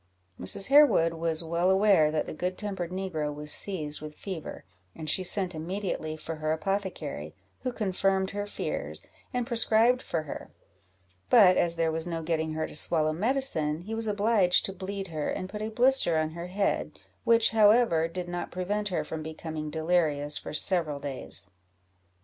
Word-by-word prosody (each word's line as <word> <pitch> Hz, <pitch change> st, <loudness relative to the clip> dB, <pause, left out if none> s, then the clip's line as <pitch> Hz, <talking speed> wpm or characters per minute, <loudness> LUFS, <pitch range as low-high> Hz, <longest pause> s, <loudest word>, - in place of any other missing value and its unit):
Mrs. 195 Hz, -, +1 dB
Harewood 275 Hz, -, +6 dB
was 165 Hz, 0 st, +2 dB
well 170 Hz, +2 st, +1 dB
aware 190 Hz, -5 st, +5 dB
that 155 Hz, 0 st, -1 dB
the -, -, -6 dB
good 180 Hz, +4 st, -3 dB
tempered 195 Hz, -5 st, -4 dB
negro 180 Hz, -5 st, -3 dB
was 150 Hz, 0 st, -1 dB
seized 155 Hz, -7 st, -1 dB
with 155 Hz, 0 st, -9 dB
fever, 185 Hz, -6 st, -7 dB, 0.3 s
and 155 Hz, -, -7 dB
she 185 Hz, +5 st, +3 dB
sent 185 Hz, 0 st, +1 dB
immediately 160 Hz, -1 st, -4 dB
for 160 Hz, +1 st, -6 dB
her 155 Hz, 0 st, -1 dB
apothecary, 195 Hz, +4 st, -3 dB, 0.2 s
who 255 Hz, -, -3 dB
confirmed 195 Hz, -3 st, 0 dB
her 205 Hz, 0 st, -4 dB
fears, -, -, -4 dB, 0.3 s
and 250 Hz, -3 st, -1 dB
prescribed 235 Hz, +1 st, +3 dB
for 160 Hz, -2 st, -3 dB
her; 145 Hz, -, -8 dB, 0.8 s
but 200 Hz, -7 st, +7 dB
as 170 Hz, -1 st, +2 dB
there 165 Hz, -1 st, +1 dB
was 160 Hz, +1 st, 0 dB
no 165 Hz, -1 st, -3 dB
getting 160 Hz, -1 st, -1 dB
her 155 Hz, 0 st, -1 dB
to -, -, -9 dB
swallow 155 Hz, 0 st, +2 dB
medicine, 175 Hz, -, 0 dB
he 215 Hz, +5 st, -7 dB
was 225 Hz, 0 st, -1 dB
obliged 205 Hz, -3 st, +3 dB
to 195 Hz, -, -2 dB
bleed 195 Hz, 0 st, -5 dB
her, 155 Hz, -2 st, -3 dB
and 185 Hz, -1 st, -4 dB
put 210 Hz, +1 st, -6 dB
a 215 Hz, -, -2 dB
blister 245 Hz, -7 st, +3 dB
on 155 Hz, 0 st, 0 dB
her 170 Hz, +2 st, -6 dB
head, 195 Hz, +2 st, -1 dB, 0.3 s
which, 230 Hz, -1 st, +4 dB
however, 210 Hz, -6 st, +4 dB
did 175 Hz, +1 st, -5 dB
not 175 Hz, 0 st, -4 dB
prevent 205 Hz, +4 st, -2 dB
her 175 Hz, -6 st, -1 dB
from 160 Hz, +1 st, -6 dB
becoming 155 Hz, 0 st, -6 dB
delirious 155 Hz, -2 st, 0 dB
for -, -, -6 dB
several 155 Hz, -2 st, 0 dB
days. 130 Hz, -8 st, -6 dB
175 Hz, 175 wpm, -28 LUFS, 155-205 Hz, 0.8 s, but